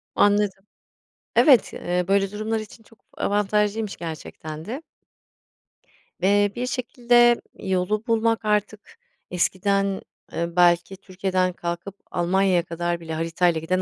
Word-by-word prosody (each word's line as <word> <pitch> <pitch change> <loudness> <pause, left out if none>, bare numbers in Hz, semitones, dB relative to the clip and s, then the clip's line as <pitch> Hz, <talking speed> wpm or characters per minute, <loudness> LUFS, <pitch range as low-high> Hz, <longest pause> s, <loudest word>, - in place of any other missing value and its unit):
Anladım. 205 -1 +2 0.7
Evet, 265 -8 +5
ııı, 180 0 -2
böyle 195 0 +2
durumlar 215 +2 -2
için 215 +1 -11
çok 225 - -22 0.2
avantajlıymış 210 +1 0
gerçekten 160 -1 -7
de. 265 - -6 1.4
Eee, 205 +1 +3
bir 245 - -2
şekilde 240 -1 +3 0.2
yolu 190 +2 -1
bulmak 225 -1 +1
artık 210 - -1 0.3
eskiden, 195 +2 0 0.3
ııı, 170 0 -3
belki 175 +1 +3
Türkiye'den 185 -1 -1
kalkıp 175 +3 -5 0.2
Almanya'ya 180 0 +2
kadar 170 +1 -3
bile 160 -1 -6
haritayla 165 +1 +1
giden 185 +3 0
195 Hz, 115 wpm, -24 LUFS, 175-210 Hz, 1.4 s, Evet